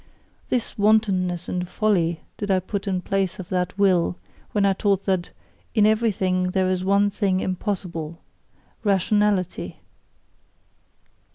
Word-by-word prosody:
This 240 -3 -1
wantonness 195 -5 +2
and 180 -1 -3
folly 175 -7 +1
did 205 - -5
I 190 -1 +4
put 200 +2 -4
in 185 -2 0
place 195 -2 -1
of 185 -2 -8
that 180 +1 -1
Will, 185 -4 +3 0.4
when 205 -2 +2
I 195 - +4
taught 195 0 +1
that 185 -3 0 0.5
"In 210 -2 +5
everything 195 -5 +2
there 185 0 +1
is 185 -1 0
one 200 +1 +3
thing 195 -2 +1
impossible 180 -4 -3 0.6
rationality!" 200 -2 +1
190 Hz, 125 wpm, -23 LUFS, 180-205 Hz, 0.6 s, In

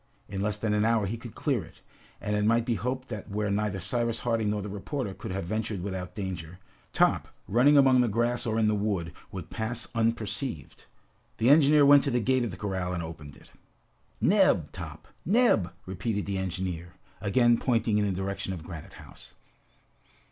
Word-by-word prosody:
In 95 -1 -4
less 105 +1 0
than 105 0 -1
an 105 0 +2
hour 115 -2 +2
he 100 +4 -2
could 115 -1 -10
clear 135 - 0
it, 80 - -15 0.4
and 105 - -2
it 105 - +1
might 115 +2 +3
be 120 - +1
hoped 125 +3 -3
that 110 -4 -6
where 105 0 -1
neither 100 -1 -1
Cyrus 115 +5 -1
Harding 115 -3 0
nor 105 -1 -1
the - - -5
reporter 105 +3 -4
could - - -8
have 95 -1 -3
ventured 110 -1 -3
without 95 -2 -5
danger, 90 -4 -5 0.3
Top, - - +2 0.2
running 130 +7 +5
among 130 -2 +6
the 120 - +2
grass 120 +3 0
or 110 0 0
in 110 -1 +3
the 105 - +3
wood, 100 -6 -1 0.2
would - - -7
pass 115 +2 -3
unperceived. 115 - -2 0.5
The 120 +4 +4
engineer 145 -1 +6
went 145 0 +8
to 140 - -1
the 125 -2 +1
gate 130 +2 +2
of 120 - -1
the 90 - -8
corral 95 -2 -2
and 85 -2 -3
opened 75 -3 -9
it. - - -18 0.7
"Neb, - - +3
Top! - - -8 0.2
Neb!" 195 - +3
repeated 100 +3 -2
the 100 -1 -2
engineer, 90 -2 -4 0.3
again 120 +3 +3
pointing 115 -4 +1
in 105 - +2
the 100 - 0
direction 95 +1 -3
of 85 -4 -7
Granite 85 -3 -9
House. - - -14
105 Hz, 190 wpm, -28 LUFS, 95-120 Hz, 0.7 s, went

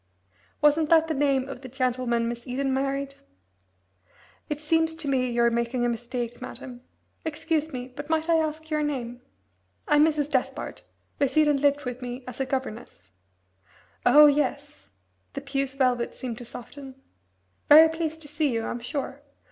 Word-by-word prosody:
"Wasn't 300 +1 +4
that 325 -1 +5
the 320 - -1
name 275 -2 +1
of 275 -2 -8
the 260 - -9
gentleman 250 -2 0
Miss 235 +1 -5
Eden 265 +2 -1
married?" 275 +1 -1 1.4
"It 300 -1 -2
seems 320 +1 +1
to 320 -2 -5
me 255 -2 +1
you're 235 0 +2
making 235 +1 0
a - - +2
mistake, 240 +1 -4
madam. 255 -1 -8 0.4
Excuse 320 0 -1
me, 250 -1 -5
but 290 +4 -9
might 320 0 +1
I 335 -1 +4
ask 315 0 -3
your 305 0 +1
name?" 250 -5 -3 0.7
"I'm 295 0 +5
Mrs. 305 -2 +2
Despard. 260 -4 -2 0.4
Miss 280 +1 +1
Eden 295 -2 +4
lived 285 -1 +2
with 250 0 -5
me 250 +1 -6
as 255 - -6
governess." 235 - -5 0.9
"Oh, 295 +5 +8
yes" 275 - 0 0.4
the 275 - -5
puce 275 -1 -2
velvet 250 -3 +1
seemed 240 -3 -6
to 245 - -9
soften 265 +3 -10 0.7
"very 315 +2 +10
pleased 320 0 -4
to - - -10
see 295 -1 0
you, 230 -1 -1
I'm 240 - -3
sure! 270 +3 -5
275 Hz, 160 wpm, -26 LUFS, 245-300 Hz, 1.4 s, very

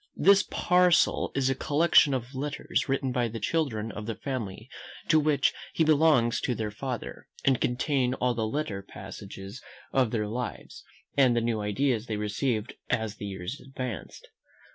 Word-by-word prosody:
This 200 0 +6
parcel 180 -1 +3
is 135 -1 +2
a - - +3
collection 145 0 +4
of 125 +1 -5
letters 145 +1 -2
written 135 -1 0
by 125 -1 +1
the 115 0 -6
children 115 -10 -1
of 105 +2 -7
the 115 - -2
family 115 -5 -5 0.4
to 155 - +6
which 150 -1 +2 0.2
he 165 - +2
belongs 150 -6 +4
to 125 - -1
their 110 -2 -3
father, 125 +2 -6 0.2
and 135 -3 +3
contain 125 0 +1
all 125 -1 +1
the 110 -1 -1
little 110 -6 -3
passages 100 +2 -9 0.3
of 130 -3 +3
their 110 -2 -1
lives, 120 +4 -5 0.3
and 130 -4 +5
the - - +3
new 115 -2 0
ideas 115 +2 0
they 110 - -2
received 105 +2 -1 0.2
as 110 -2 -1
the 100 - -5
years 95 +5 -5
advanced. 130 - -7
125 Hz, 165 wpm, -28 LUFS, 110-140 Hz, 0.4 s, This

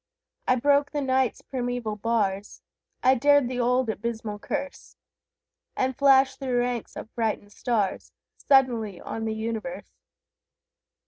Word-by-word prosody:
I 255 - +4
broke 285 +3 +3
the 290 0 -2
Night's 260 -2 0
primeval 245 -4 -3
bars, 205 -2 -1 0.4
I 260 - +6
dared 285 +1 +4
the 250 0 -3
old 250 +1 +2
abysmal 220 -1 -4
curse, 280 +6 -5 0.8
And 260 0 0
flashed 270 -1 +4
through 260 -3 -1
ranks 245 -1 -2
of 220 - -8
frightened 215 -3 -2
stars 220 -6 -1 0.2
Suddenly 235 -8 +2
on 225 0 -5
the 220 0 -2
universe! 230 +4 -5
245 Hz, 125 wpm, -26 LUFS, 220-265 Hz, 0.8 s, I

